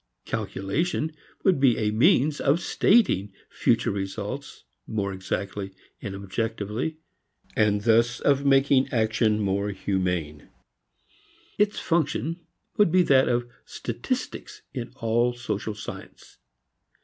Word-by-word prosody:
Calculation 150 Hz, -, -2 dB, 0.3 s
would 185 Hz, -7 st, +3 dB
be 130 Hz, -4 st, +4 dB
a 105 Hz, -1 st, 0 dB
means 135 Hz, +6 st, +3 dB
of 145 Hz, +4 st, +3 dB
stating 175 Hz, -, +3 dB, 0.2 s
future -, -, +1 dB
results 100 Hz, +7 st, -5 dB, 0.2 s
more 100 Hz, -3 st, -2 dB
exactly 95 Hz, +1 st, -4 dB, 0.3 s
and 100 Hz, -1 st, -5 dB
objectively 105 Hz, +7 st, -3 dB, 0.6 s
and 105 Hz, -1 st, +2 dB
thus 115 Hz, +2 st, +3 dB
of 140 Hz, -1 st, +2 dB
making 135 Hz, -1 st, +4 dB
action 110 Hz, -2 st, +2 dB
more 100 Hz, 0 st, 0 dB
humane. 90 Hz, -6 st, -2 dB, 1.1 s
Its 210 Hz, 0 st, +2 dB
function 165 Hz, +1 st, 0 dB, 0.4 s
would 205 Hz, -6 st, +4 dB
be 180 Hz, +1 st, +5 dB
that 135 Hz, -5 st, +4 dB
of 120 Hz, 0 st, 0 dB, 0.2 s
statistics -, -, -5 dB
in 125 Hz, -2 st, -5 dB
all 120 Hz, +2 st, +1 dB
social 110 Hz, -3 st, -4 dB
science. 105 Hz, -, -10 dB
115 Hz, 110 wpm, -26 LUFS, 100-140 Hz, 1.1 s, be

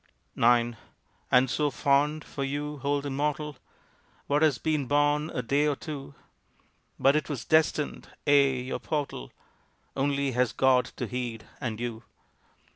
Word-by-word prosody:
IX 120 Hz, 0 st, +3 dB, 0.5 s
And 125 Hz, +1 st, +5 dB
so 150 Hz, +3 st, +1 dB
fond! 145 Hz, +3 st, +1 dB
for 140 Hz, -, -5 dB
you 145 Hz, +2 st, -3 dB
hold 140 Hz, +1 st, -1 dB
immortal 145 Hz, +1 st, -2 dB, 0.7 s
What 145 Hz, +1 st, +1 dB
has 155 Hz, -6 st, +4 dB
been 150 Hz, -2 st, -1 dB
born 145 Hz, +2 st, +2 dB
a 125 Hz, -, -3 dB
day 140 Hz, +5 st, +2 dB
or 145 Hz, -, +1 dB
two! 140 Hz, -2 st, -8 dB, 0.8 s
"But 135 Hz, +2 st, +4 dB
it 155 Hz, -, 0 dB
was 140 Hz, -5 st, -4 dB
destined?" 155 Hz, -2 st, +1 dB, 0.2 s
Ay, 140 Hz, -3 st, +4 dB
your 130 Hz, -, -3 dB
portal 145 Hz, -, -4 dB, 0.6 s
Only 140 Hz, 0 st, 0 dB
has 125 Hz, -2 st, +1 dB
God 130 Hz, 0 st, +4 dB
to -, -, -3 dB
heed 120 Hz, -3 st, -4 dB
and 115 Hz, -5 st, -4 dB
you! 120 Hz, -2 st, -4 dB
140 Hz, 140 wpm, -28 LUFS, 125-150 Hz, 0.8 s, And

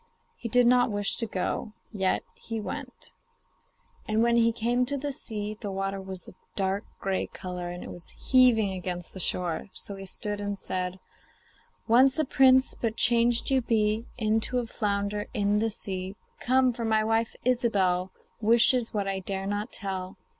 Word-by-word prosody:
He 235 Hz, -, -6 dB
did 245 Hz, +2 st, +4 dB
not 245 Hz, 0 st, +4 dB
wish 205 Hz, -1 st, 0 dB
to 230 Hz, -, -1 dB
go, 210 Hz, +2 st, -3 dB, 0.2 s
yet 190 Hz, -4 st, 0 dB
he 225 Hz, -1 st, -6 dB
went. 210 Hz, -, -7 dB, 1.0 s
When 230 Hz, +2 st, +3 dB
he 230 Hz, -1 st, +4 dB
came 240 Hz, +2 st, +1 dB
to 285 Hz, -, 0 dB
the 285 Hz, +1 st, -3 dB
sea, 215 Hz, -4 st, -5 dB
the 205 Hz, -, -4 dB
water 195 Hz, 0 st, -3 dB
was 190 Hz, -1 st, -9 dB
a -, -, -11 dB, 0.2 s
dark 195 Hz, +1 st, -1 dB
grey 195 Hz, -1 st, -1 dB
colour, 180 Hz, -1 st, -6 dB
and 175 Hz, 0 st, -7 dB
it -, -, -8 dB
was 175 Hz, -, -11 dB
heaving 245 Hz, -6 st, +4 dB
against 180 Hz, -2 st, -5 dB
the 190 Hz, -, -8 dB
shore. 180 Hz, 0 st, 0 dB
So 200 Hz, -, -8 dB
he 195 Hz, 0 st, -8 dB
stood 205 Hz, +2 st, -4 dB
and 205 Hz, 0 st, -3 dB
said: 185 Hz, -1 st, -3 dB, 0.9 s
'Once 260 Hz, +4 st, +5 dB
a 310 Hz, -, +2 dB
prince, 260 Hz, 0 st, +5 dB
but 225 Hz, -1 st, -3 dB
changed 235 Hz, +1 st, +3 dB
you 265 Hz, -1 st, +3 dB
be 220 Hz, -1 st, +1 dB
Into 225 Hz, +2 st, +1 dB
a 245 Hz, -, 0 dB
flounder 205 Hz, -2 st, -2 dB
in 205 Hz, 0 st, +2 dB
the 225 Hz, +1 st, +1 dB
sea. 190 Hz, -2 st, -5 dB, 0.2 s
Come! 255 Hz, 0 st, +3 dB
for 235 Hz, -, -5 dB
my 220 Hz, -1 st, +2 dB
wife, 225 Hz, +1 st, 0 dB
Ilsebel, 195 Hz, -7 st, +1 dB, 0.3 s
Wishes 230 Hz, +1 st, +4 dB
what 200 Hz, -1 st, 0 dB
I 195 Hz, 0 st, -1 dB
dare 190 Hz, 0 st, -4 dB
not 205 Hz, +1 st, -3 dB
tell. 190 Hz, -2 st, -4 dB
210 Hz, 170 wpm, -27 LUFS, 195-235 Hz, 1.0 s, Once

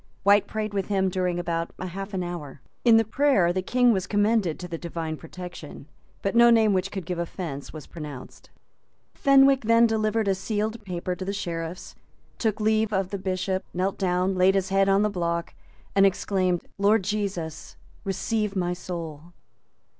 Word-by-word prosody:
White 200 Hz, 0 st, +5 dB
prayed 215 Hz, -1 st, -3 dB
with 195 Hz, -2 st, -1 dB
him 190 Hz, -2 st, +1 dB
during 180 Hz, -1 st, -1 dB
about 170 Hz, -1 st, -2 dB
half 195 Hz, +2 st, -5 dB
an 185 Hz, -, -1 dB
hour. 165 Hz, -6 st, -6 dB, 0.2 s
In 230 Hz, -2 st, +7 dB
the 225 Hz, -, +3 dB
prayer 220 Hz, -7 st, +2 dB
the 185 Hz, -, -1 dB
King 245 Hz, +4 st, +3 dB
was 190 Hz, -1 st, -2 dB
commended 205 Hz, -5 st, +1 dB
to 180 Hz, -, -7 dB
the 165 Hz, -2 st, -5 dB
Divine 165 Hz, -2 st, -4 dB
protection; 175 Hz, -3 st, -9 dB, 0.4 s
but 195 Hz, +3 st, -1 dB
no 235 Hz, 0 st, +7 dB
name 220 Hz, -3 st, +5 dB
which 190 Hz, 0 st, 0 dB
could 190 Hz, -4 st, -6 dB
give 175 Hz, 0 st, -3 dB
offence 165 Hz, -5 st, -5 dB
was 155 Hz, -3 st, -9 dB
pronounced. 150 Hz, -6 st, -10 dB, 0.6 s
Fenwick 275 Hz, -2 st, +5 dB
then 230 Hz, +1 st, +5 dB
delivered 220 Hz, -1 st, +1 dB
a 195 Hz, -, +3 dB
sealed 215 Hz, +3 st, -3 dB
paper 180 Hz, -1 st, -3 dB
to 185 Hz, -, -6 dB
the 195 Hz, -, -2 dB
Sheriffs, 170 Hz, -3 st, -5 dB, 0.5 s
took 220 Hz, -2 st, 0 dB
leave 215 Hz, 0 st, +2 dB
of 190 Hz, -2 st, 0 dB
the 200 Hz, -, -3 dB
Bishop, 185 Hz, 0 st, -2 dB
knelt 190 Hz, +2 st, -1 dB
down, 185 Hz, 0 st, +1 dB
laid 185 Hz, +1 st, +4 dB
his 190 Hz, -1 st, 0 dB
neck 195 Hz, 0 st, +3 dB
on 195 Hz, +1 st, +4 dB
the -, -, +3 dB
block, 170 Hz, -2 st, -2 dB, 0.4 s
and 195 Hz, -, +5 dB
exclaimed, 185 Hz, -2 st, +1 dB
"Lord 205 Hz, +1 st, +4 dB
Jesus, 190 Hz, -6 st, -4 dB, 0.3 s
receive 210 Hz, +2 st, -1 dB
my 180 Hz, -2 st, 0 dB
soul." 170 Hz, -2 st, -7 dB
190 Hz, 175 wpm, -25 LUFS, 175-210 Hz, 0.6 s, In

